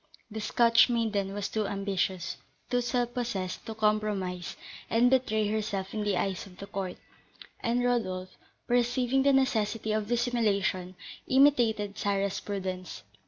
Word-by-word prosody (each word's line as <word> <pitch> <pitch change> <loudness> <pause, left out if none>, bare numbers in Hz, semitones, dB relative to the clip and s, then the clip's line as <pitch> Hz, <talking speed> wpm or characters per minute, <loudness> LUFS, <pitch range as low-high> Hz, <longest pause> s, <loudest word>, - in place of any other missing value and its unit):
The 220 +1 -4
Scotch 230 +2 +5
maiden 215 -5 0
was 205 -1 -2
too 215 -2 -1
ambitious, 195 -3 -2 0.3
too 245 0 +2
self 240 0 -1
possessed, 220 -7 -3
to 225 - -5
compromise 210 -4 -1 0.3
and 240 +2 +4
betray 220 -5 +2
herself 205 -2 -2
in 215 - -2
the 205 -3 +1
eyes 190 +1 -2
of 180 -1 -16
the 200 - -7
court; 195 -2 -4 0.6
and 240 +1 0
Rodolph, 185 -7 -1 0.3
perceiving 245 +2 +2
the 280 +1 +4
necessity 225 -5 +1
of 215 -1 0
dissimulation, 210 -6 0 0.3
imitated 235 -7 +3
Sarah's 200 -1 0
prudence. 185 - -5
215 Hz, 135 wpm, -29 LUFS, 195-240 Hz, 0.6 s, Scotch